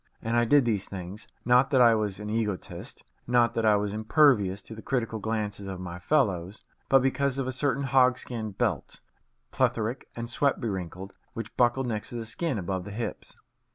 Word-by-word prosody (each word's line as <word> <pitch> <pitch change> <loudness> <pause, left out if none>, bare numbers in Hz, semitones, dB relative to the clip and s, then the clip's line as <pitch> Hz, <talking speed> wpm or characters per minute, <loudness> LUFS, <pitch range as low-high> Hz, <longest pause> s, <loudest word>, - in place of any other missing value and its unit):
And 115 +1 -1
I 120 0 +4
did 140 +2 +5
these 105 -4 -1
things, 95 +1 -7 0.2
not 125 +2 +5
that 135 - +3
I 120 -2 +7
was 105 -3 -1
an 105 - -6
egotist, 105 -3 -4 0.2
not 120 -1 +3
that 115 -2 +1
I 105 - +6
was 105 0 -1
impervious 110 -4 +3
to - - -10
the 110 - -9
critical 115 -4 -2
glances 105 -2 -3
of 95 -2 -5
my 90 -1 -6
fellows, 100 - 0 0.3
but 135 -1 +5
because 135 0 +1
of 135 - -1
a 130 - -2
certain 140 +2 0
hogskin 125 -5 +1
belt, 105 - -1 0.5
plethoric 115 +3 0
and 115 0 -4
sweat 140 +4 +1
bewrinkled, 95 -3 -4 0.2
which 115 -2 -7
buckled 125 +2 +2
next 110 -3 -3
the 120 -2 -5
skin 135 +4 -2
above 95 -1 -3
the 105 - -8
hips. 115 +3 -5
115 Hz, 185 wpm, -27 LUFS, 100-125 Hz, 0.5 s, I